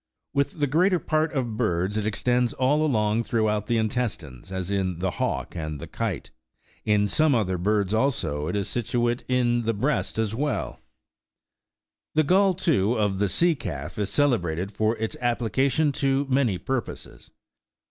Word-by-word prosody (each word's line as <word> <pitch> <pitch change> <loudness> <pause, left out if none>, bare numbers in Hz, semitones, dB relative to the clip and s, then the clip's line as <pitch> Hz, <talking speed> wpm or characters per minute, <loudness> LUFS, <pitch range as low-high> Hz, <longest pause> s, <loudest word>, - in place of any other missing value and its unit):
With 140 0 +1
the 145 - +3
greater 180 +7 +3
part 155 -1 0
of 120 -6 -2
birds, 95 -3 0
it 110 -1 -1
extends 120 +3 +1
all 145 +4 +2
along 110 -6 +1
throughout 105 -3 0
the 120 - +1
intestines, 105 - -3
as 95 0 -3
in 95 -3 -1
the 95 +1 -1
hawk - - -3
and 75 -3 -4
the - - -6
kite. - - -4 0.5
In 105 -1 +2
some 155 +6 +3
other 95 -5 0
birds, 100 +1 +1
also, 105 - 0
it - - -2
is 100 -2 -1
situate 120 0 -1
in 120 -2 +2
the 115 -1 -1
breast 135 +5 -1
as 110 -1 0
well: 145 +4 -2 1.4
the 155 - +4
gall, 190 +4 +3
too, 125 - +1
of 105 -4 0
the 100 -1 +1
sea 170 - +3
calf 80 - -6
is 100 -1 -1
celebrated 95 - +1
for 110 +1 0
its 110 0 -3
application 125 +5 +1
to 140 -1 +1
many 130 -7 +2
purposes. 130 +2 -5
115 Hz, 160 wpm, -25 LUFS, 100-135 Hz, 1.4 s, the